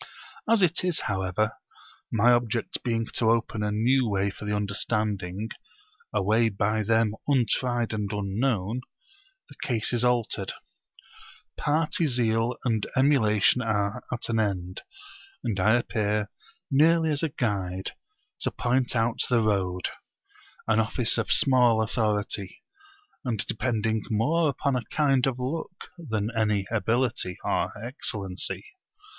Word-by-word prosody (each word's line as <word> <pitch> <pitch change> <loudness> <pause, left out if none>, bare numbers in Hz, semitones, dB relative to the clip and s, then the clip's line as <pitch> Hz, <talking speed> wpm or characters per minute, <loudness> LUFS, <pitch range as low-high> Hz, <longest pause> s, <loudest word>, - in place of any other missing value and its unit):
As 225 -3 +5
it 175 0 +2
is 180 -3 +1
however, 95 +2 -1 0.6
my 115 +2 +4
object 120 -1 0
being 115 -2 -1
to 110 - +2
open 115 -1 0
a 105 - 0
new 120 +3 +2
way 100 0 0
for 105 - -10
the 105 0 -1
understanding, 105 -1 -1 0.6
a - - 0
way 110 +3 +3
by 105 +1 0
them 110 0 +2
untried 120 -3 +1
and 105 -2 -2
unknown, 105 +2 -1 0.7
the - - -14
case 120 -3 0
is 120 0 +1
altered; 125 -2 0 1.0
party 155 +2 +1
zeal 120 -2 +1
and 110 -4 +1
emulation 115 -6 +4
are 105 -3 -1
at 120 - -2
an 115 -1 0
end; 95 -4 -2 0.6
and 100 -4 -2
I 110 +5 +4
appear 105 -3 -1 0.4
merely 160 +3 +4
as 145 - +1
a 165 - 0
guide 95 - -2 0.5
to - - 0
point 125 0 0
out 115 0 +1
the 125 -2 +3
road; 95 -4 0 0.8
an 110 0 +3
office 110 +1 0
of 115 - -1
small 125 -4 +5
authority, 105 -3 -2 0.6
and 115 -6 -1
depending 110 -2 -1
more 150 +9 +2
upon 140 0 -1
a 125 - 0
kind 135 -4 +2
of 130 -2 -1
luck 155 +7 -5
than 110 -8 -2
upon 115 -2 -1
any 105 -2 +1
ability 115 -3 0
or - - 0
excellency. 105 -5 -1
115 Hz, 135 wpm, -26 LUFS, 105-125 Hz, 1.0 s, As